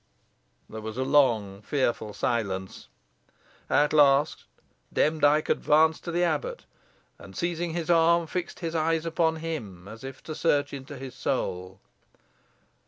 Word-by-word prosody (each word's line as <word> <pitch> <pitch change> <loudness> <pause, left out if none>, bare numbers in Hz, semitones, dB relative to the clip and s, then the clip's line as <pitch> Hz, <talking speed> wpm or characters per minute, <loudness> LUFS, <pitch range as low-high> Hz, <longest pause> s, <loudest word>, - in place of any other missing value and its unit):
There 110 - -8
was 110 +1 -6
a 130 - 0
long, 115 -8 +2
fearful 115 -4 -1
silence. 100 -6 -2 0.8
At 150 +1 +3
last 145 0 +4 0.5
Demdike 155 -1 +2
advanced 160 +1 +3
to 170 - -3
the 175 +1 +1
abbot, 485 - -2 0.5
and, - - -13
seizing 170 -1 -2
his 170 0 -1
arm, 170 0 +4
fixed 180 +3 -5
his 165 -1 -3
eyes 165 0 0
upon 165 0 +1
him, 115 - -6
as 110 +3 -11
if 135 -1 -9
to 155 - -6
search 145 -3 +1
into 140 +1 -8
his 130 -1 -8
soul. 95 -8 -3
145 Hz, 135 wpm, -27 LUFS, 115-165 Hz, 0.8 s, last